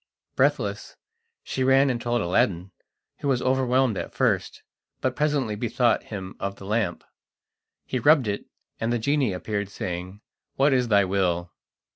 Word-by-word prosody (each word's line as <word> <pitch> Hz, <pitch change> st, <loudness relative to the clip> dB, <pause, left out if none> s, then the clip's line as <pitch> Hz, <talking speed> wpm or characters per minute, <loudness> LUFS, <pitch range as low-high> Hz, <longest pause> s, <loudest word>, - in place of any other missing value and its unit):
Breathless, -, -, 0 dB, 0.5 s
she 130 Hz, -, -2 dB
ran 135 Hz, +1 st, +4 dB
and 120 Hz, -1 st, -3 dB
told 120 Hz, 0 st, 0 dB
Aladdin, 90 Hz, +1 st, +1 dB, 0.5 s
who -, -, -3 dB
was 130 Hz, -3 st, +2 dB
overwhelmed 130 Hz, -3 st, +2 dB
at -, -, -7 dB
first, -, -, 0 dB, 0.4 s
but 130 Hz, -1 st, -1 dB
presently 145 Hz, -7 st, 0 dB
bethought 120 Hz, +2 st, +1 dB
him 95 Hz, -3 st, -7 dB
of 100 Hz, 0 st, -3 dB
the 100 Hz, -, -11 dB
lamp. 110 Hz, +2 st, -1 dB, 0.8 s
He 130 Hz, -, -2 dB
rubbed 145 Hz, -1 st, +5 dB
it, 100 Hz, 0 st, -3 dB, 0.3 s
and 115 Hz, +1 st, -1 dB
the 120 Hz, -, +2 dB
genie 135 Hz, 0 st, +1 dB
appeared, 100 Hz, +2 st, -3 dB
saying: 90 Hz, +1 st, -5 dB, 0.3 s
"What 140 Hz, +1 st, +3 dB
is 125 Hz, -2 st, +2 dB
thy 100 Hz, -3 st, +4 dB
will?" 90 Hz, -2 st, 0 dB
115 Hz, 150 wpm, -25 LUFS, 100-130 Hz, 0.8 s, rubbed